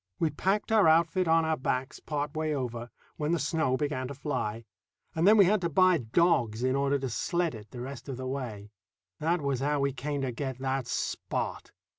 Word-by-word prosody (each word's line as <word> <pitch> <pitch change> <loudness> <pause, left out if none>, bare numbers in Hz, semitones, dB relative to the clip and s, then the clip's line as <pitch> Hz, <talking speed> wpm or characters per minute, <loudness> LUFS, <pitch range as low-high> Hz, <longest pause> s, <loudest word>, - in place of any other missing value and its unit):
We 160 -2 +1
packed 195 +8 0
our 215 -5 +5
outfit 170 +3 +3
on 165 0 +4
our 160 0 +1
backs 130 0 -2
part 150 0 -3
way 155 -1 -1
over, 120 -3 -4 0.3
when 150 +2 0
the - - +2
snow 150 -4 0
began 145 -3 -2
to 140 - -7
fly, 125 -6 -3 0.5
and 165 +3 +2
then 215 +2 +7
we 200 - +8
had 205 +2 +2
to 170 - 0
buy 185 +2 +4
dogs 120 -3 +2
in 130 +1 +2
order 140 0 +2
to 135 -1 -3
sled 170 +8 -1
it 110 -2 -10
the 120 - -8
rest 135 +2 -7
of 130 - -4
the 130 - -5
way. 120 -6 -5 0.5
That 165 +2 +1
was 140 -3 -1
how 145 +2 0
we 140 -1 +1
came 145 +1 -3
to 130 -2 -1
get 130 +1 -4
that 130 -1 -2
Spot. - - -3
140 Hz, 210 wpm, -29 LUFS, 130-160 Hz, 0.5 s, we